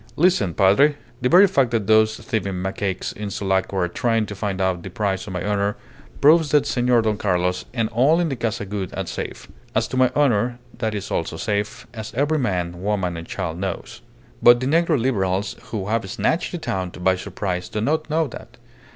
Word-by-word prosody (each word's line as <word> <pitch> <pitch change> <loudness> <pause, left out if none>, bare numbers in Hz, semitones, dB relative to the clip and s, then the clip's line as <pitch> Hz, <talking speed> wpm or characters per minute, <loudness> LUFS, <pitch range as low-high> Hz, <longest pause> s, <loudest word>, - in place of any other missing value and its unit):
"Listen, 150 - +2
Padre. 105 +10 +4 0.3
The 125 - +2
very 185 +6 +8
fact 140 -10 +2
that 115 -3 -1
those 110 +1 +4
thieving 100 -4 -3
macaques 95 0 -3
in 105 0 -5
Sulaco 95 0 -1
are 90 -2 +2
trying 115 +4 0
to 105 - -7
find 100 -1 -3
out 95 -2 0
the - - -7
price 100 -2 -2
of 95 - -6
my 90 - -3
honour 100 0 0 0.5
proves 155 +1 +6
that 145 0 +3
Senor 120 -2 +2
Don 110 -1 0
Carlos 90 -3 0
and 115 -3 0
all 135 +9 +3
in 170 -2 +1
the 135 - -2
Casa 115 -3 -2
Gould 95 -2 -4
are - - -2
safe. - - -6 0.3
As 110 +1 +2
to 130 - -3
my 130 -1 +5
honour, 120 -4 +2 0.2
that 110 -2 -1 0.2
also 80 - -2
is - - -5
safe, 105 -1 -2
as 110 -1 -7
every 145 +4 +1
man, 90 -7 -2
woman, 95 -3 -1
and 85 0 -7
child 85 -3 -4
knows. 95 -1 -5 0.4
But 120 0 +7
the 130 - -2
negro 160 +1 +2
Liberals 100 -5 0
who 105 -4 -4
have 110 -3 -1
snatched 160 - 0
the 175 - -3
town 95 - -3
by 95 +1 +1
surprise 90 -1 -4
do 105 - -3
not 155 +8 0
know 160 +1 +2
that. 130 - -10
105 Hz, 205 wpm, -22 LUFS, 95-130 Hz, 0.5 s, very